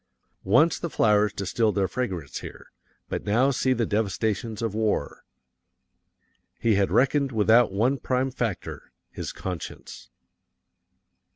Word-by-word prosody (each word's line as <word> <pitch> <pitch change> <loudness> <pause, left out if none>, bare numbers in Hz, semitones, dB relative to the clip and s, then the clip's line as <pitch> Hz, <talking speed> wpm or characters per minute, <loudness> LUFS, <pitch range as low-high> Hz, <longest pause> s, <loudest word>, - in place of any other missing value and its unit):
Once 150 - +3
the 170 - -3
flowers 105 -5 +3
distilled 105 +3 -1
their 100 -2 +1
fragrance 90 - -4
here, - - -11 0.4
but - - -4
now 120 +7 +2
see 130 0 0
the 120 -2 +1
devastations 110 +1 -2
of 115 -3 -1
war. 110 -9 -1 1.4
He 115 - +2
had 100 -1 +2
reckoned 140 +1 +2
without 110 +1 +4
one 120 +8 +1
prime 130 +1 -1
factor 115 -7 -5 0.2
his - - -5
conscience. 90 -3 -7
110 Hz, 120 wpm, -25 LUFS, 100-125 Hz, 1.4 s, without